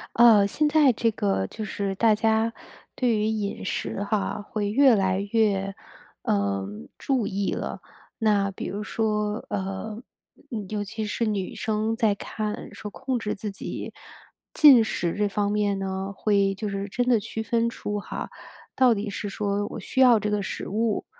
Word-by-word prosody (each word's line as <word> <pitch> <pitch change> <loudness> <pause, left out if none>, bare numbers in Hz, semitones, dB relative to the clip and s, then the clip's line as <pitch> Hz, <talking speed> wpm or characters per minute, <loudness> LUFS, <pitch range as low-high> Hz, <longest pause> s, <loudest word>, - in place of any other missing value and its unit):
呃， 225 -4 +7
现 300 +8 +1
在 295 -3 +5
这 230 0 +1
个 95 - 0
就 215 - -7
是 200 -2 -2
大 220 +1 +4
家 220 +1 +1 0.4
对 250 -2 +1
于 210 - 0
饮 215 -2 -2
食 195 - -3
哈， 210 0 -1
会 205 0 -3
越 260 +2 +6
来 190 -2 +1
越， 195 -3 +1 0.5
呃， 100 -1 0 0.3
注 255 -6 0
意 200 0 -1
了。 - - -4 0.4
那 205 -3 +2
比 195 - -7
如 200 +2 -4
说， 210 -1 -1
呃， 205 +2 -4 0.5
嗯， 215 -5 -4
尤 210 -1 -2
其 215 +2 -5
是 220 +2 -1
女 200 -3 -2
生 220 +1 -1
在 220 -3 +2
看 210 +1 -5
说 210 - -7
控 260 +4 -3
制 210 -2 -3
自 210 +1 -5
己 195 - -6 0.6
进 275 -7 +8
食 175 -5 -1
这 210 0 +1
方 205 0 0
面 205 -1 +1
呢， 190 0 -3
会 200 -1 +2
就 210 +2 -4
是 200 0 -3
真 245 +5 -1
的 240 -3 +4
区 220 +2 -5
分 235 +1 +1
出 210 -2 -4
哈， - - -6 0.5
到 255 -2 +5
底 205 +1 -3
是 205 0 -4
说 205 0 -1
我 - - -6
需 265 - -1
要 245 -4 +7
这 210 0 -2
个 210 -1 +1
食 195 - -5
物， 220 +1 0
210 Hz, 185 characters per minute, -25 LUFS, 200-225 Hz, 0.6 s, 进